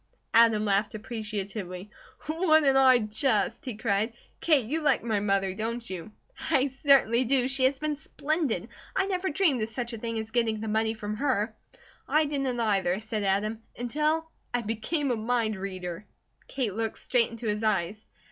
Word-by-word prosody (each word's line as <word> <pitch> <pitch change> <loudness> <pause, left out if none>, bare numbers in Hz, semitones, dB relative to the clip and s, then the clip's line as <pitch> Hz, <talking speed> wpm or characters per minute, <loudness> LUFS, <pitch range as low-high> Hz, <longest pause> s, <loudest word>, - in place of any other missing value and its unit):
Adam 225 -2 +5
laughed 205 +1 +1
appreciatively. 210 -4 -5 0.4
"Wouldn't 310 -4 +3
I 260 -1 +7
just!" 220 +4 0
he 250 -4 -4
cried. 215 0 0 0.3
"Kate, 295 -8 +3
you 310 +8 -2
like 300 - +2
my 220 -3 0
mother, 195 -2 +1
don't 230 +3 -4
you?" 185 +2 -7 0.4
"I 275 -4 +4
certainly 265 -3 +4
do! 255 0 +2
She 265 0 +2
has 265 +1 +2
been 305 +1 -2
splendid. 290 - -2 0.3
I 385 - +2
never 380 -1 -1
dreamed 300 - +2
of 215 - -1
such 240 +1 -4
a 230 - -5
thing 230 0 -3
as 220 0 -5
getting 225 -3 +1
the 220 - -5
money 220 +1 +1
from 210 -1 -5
her." 220 -5 0 0.5
"I 305 +1 +3
didn't 275 -4 -2
either," 195 -4 +1
said 220 -1 -3
Adam, 205 +3 0 0.2
"until 305 +6 0 0.2
I 245 -1 -1
became 250 +7 -1
a - - +1
mind 225 -1 0
reader." 185 -1 -6 0.4
Kate 245 -7 -2
looked 225 +1 -3
straight 245 -3 +2
into 230 0 -8
his 210 0 -1
eyes. 210 -1 0
225 Hz, 170 wpm, -28 LUFS, 210-270 Hz, 0.5 s, I